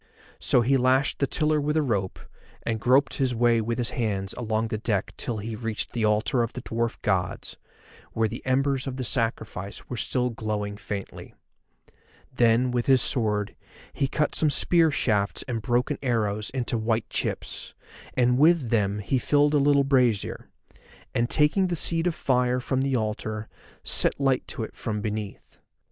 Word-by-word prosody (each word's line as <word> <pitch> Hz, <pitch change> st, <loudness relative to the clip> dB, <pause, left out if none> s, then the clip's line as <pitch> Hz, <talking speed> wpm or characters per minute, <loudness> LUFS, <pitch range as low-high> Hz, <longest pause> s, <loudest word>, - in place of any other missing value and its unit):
So 125 Hz, -, +3 dB
he 135 Hz, +3 st, +3 dB
lashed 130 Hz, +3 st, +2 dB
the 140 Hz, -, +1 dB
tiller 150 Hz, +1 st, +1 dB
with 150 Hz, +2 st, 0 dB
a 155 Hz, -, +3 dB
rope, 100 Hz, -8 st, -1 dB, 0.5 s
and 115 Hz, -1 st, -2 dB
groped 130 Hz, +4 st, +3 dB
his 130 Hz, -3 st, 0 dB
way 120 Hz, 0 st, +3 dB
with 115 Hz, +1 st, -2 dB
his 120 Hz, -2 st, -1 dB
hands 100 Hz, -5 st, -2 dB
along 110 Hz, -1 st, -2 dB
the 110 Hz, -2 st, -3 dB
deck 105 Hz, -4 st, -1 dB
till 115 Hz, -, -3 dB
he 110 Hz, +2 st, -5 dB
reached 115 Hz, -1 st, -3 dB
the 115 Hz, -3 st, 0 dB
altar 105 Hz, +4 st, +2 dB
of 115 Hz, 0 st, -2 dB
the 125 Hz, -, -6 dB
dwarf 115 Hz, +1 st, -2 dB
gods, 95 Hz, -3 st, -1 dB, 0.6 s
where 115 Hz, 0 st, +1 dB
the 115 Hz, +3 st, -7 dB
embers 135 Hz, +1 st, +1 dB
of 130 Hz, -1 st, -4 dB
the 130 Hz, -, -3 dB
sacrifice 110 Hz, -5 st, -2 dB, 0.2 s
still 125 Hz, +2 st, 0 dB
were -, -, -8 dB
glowing 105 Hz, -2 st, -3 dB
faintly. 100 Hz, -1 st, -7 dB, 1.0 s
Then 120 Hz, 0 st, +3 dB
with 120 Hz, -1 st, -1 dB
his 135 Hz, -1 st, +5 dB
sword 105 Hz, -4 st, 0 dB, 0.4 s
he 135 Hz, -, 0 dB
cut 150 Hz, +2 st, -1 dB
some 155 Hz, -, +3 dB
spear 165 Hz, +3 st, +4 dB
shafts 105 Hz, -8 st, 0 dB
and 115 Hz, -3 st, -3 dB
broken 125 Hz, +5 st, 0 dB
arrows 110 Hz, -5 st, 0 dB
into 120 Hz, -3 st, -2 dB
white 110 Hz, 0 st, 0 dB
chips, -, -, -3 dB, 0.4 s
and 125 Hz, 0 st, +3 dB
with 155 Hz, -5 st, +4 dB
them 105 Hz, -3 st, +1 dB
he 130 Hz, -, +1 dB
filled 145 Hz, +3 st, +2 dB
a 145 Hz, -, +4 dB
little 140 Hz, 0 st, +4 dB
brazier, 125 Hz, -6 st, +1 dB, 0.6 s
and 120 Hz, +1 st, 0 dB
taking 160 Hz, +6 st, +3 dB
the 175 Hz, -, -1 dB
seed 165 Hz, +1 st, +1 dB
of 170 Hz, -, -1 dB
fire 125 Hz, -1 st, +1 dB
from 130 Hz, +1 st, -1 dB
the 135 Hz, -1 st, 0 dB
altar 110 Hz, -1 st, -3 dB, 0.4 s
set -, -, +2 dB
light 135 Hz, -2 st, +1 dB
to 115 Hz, -, -4 dB
it -, -, -7 dB
from 105 Hz, -3 st, -3 dB
beneath. 105 Hz, -1 st, -6 dB
120 Hz, 175 wpm, -26 LUFS, 110-135 Hz, 1.0 s, his